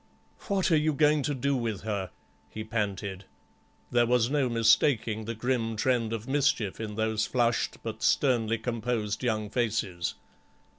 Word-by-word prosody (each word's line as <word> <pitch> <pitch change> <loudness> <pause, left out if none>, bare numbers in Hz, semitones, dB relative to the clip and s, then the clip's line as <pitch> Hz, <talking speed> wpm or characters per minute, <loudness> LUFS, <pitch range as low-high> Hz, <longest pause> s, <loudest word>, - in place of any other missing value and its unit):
"What 195 -2 +1
are - - +6
you 155 0 +1
going 150 +1 +3
to 145 +1 -1
do 140 +2 0
with 115 -5 -2
her?" 100 -4 -3 0.4
he 110 - -6
panted. 100 -3 -3 0.7
There 120 -1 +3
was 120 0 +2
no 140 -4 +2
mistaking 115 -1 +2
the 115 +1 -4
grim 115 -1 -1
trend 115 0 +1
of 115 0 -4
mischief 135 -7 +1
in 110 -2 -5
those 110 0 0
flushed 120 -2 0
by 115 - -3
sternly 115 -5 +2
composed 115 -1 -2
young 110 -3 -1
faces. 105 -7 -1
115 Hz, 150 wpm, -28 LUFS, 110-125 Hz, 0.7 s, are